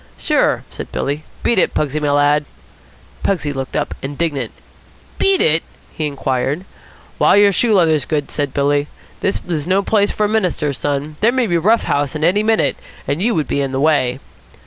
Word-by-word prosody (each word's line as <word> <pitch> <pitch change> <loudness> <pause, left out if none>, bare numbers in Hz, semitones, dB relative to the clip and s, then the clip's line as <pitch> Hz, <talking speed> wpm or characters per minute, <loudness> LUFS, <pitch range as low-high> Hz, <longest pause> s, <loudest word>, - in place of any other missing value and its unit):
"Sure," - - +1
said - - -8
Billy. 145 +3 -3 0.2
"Beat 235 - +3
it, - - +1
Pugsy, 150 0 0
my 150 -1 0
lad." 145 +1 +3 0.8
Pugsy 150 -7 -1
looked 135 -1 -5
up, 150 - -1
indignant. 140 -3 -3 0.7
"Beat 390 -1 +4
it?" 160 +1 +3 0.3
he 155 -2 -2
queried. 140 +4 -2 0.5
"While - - +5
your 205 0 +6
shoe 220 +3 +2
leather's 160 -6 +3
good," 150 -3 -2
said 145 -2 -2
Billy. 145 +1 +1 0.3
"This 195 - -1
is 160 -4 -2
no 190 +2 +2
place 205 0 +2
for 210 - 0
a - - +2
minister's 180 -10 -1
son. 145 +1 -2
There 225 +3 +4
may 255 -1 +1
be 185 - -2
a - - +1
rough 220 +7 +3
house 145 +1 -1
in 150 - -3
here 165 - +6
any 205 +3 +1
minute, 220 0 +1 0.3
and 145 +5 -1
you 230 +3 +1
would 155 - 0
be 140 - 0
in 135 -1 -2
the 130 - -1
way." 135 -4 +2
150 Hz, 195 wpm, -18 LUFS, 145-195 Hz, 0.8 s, your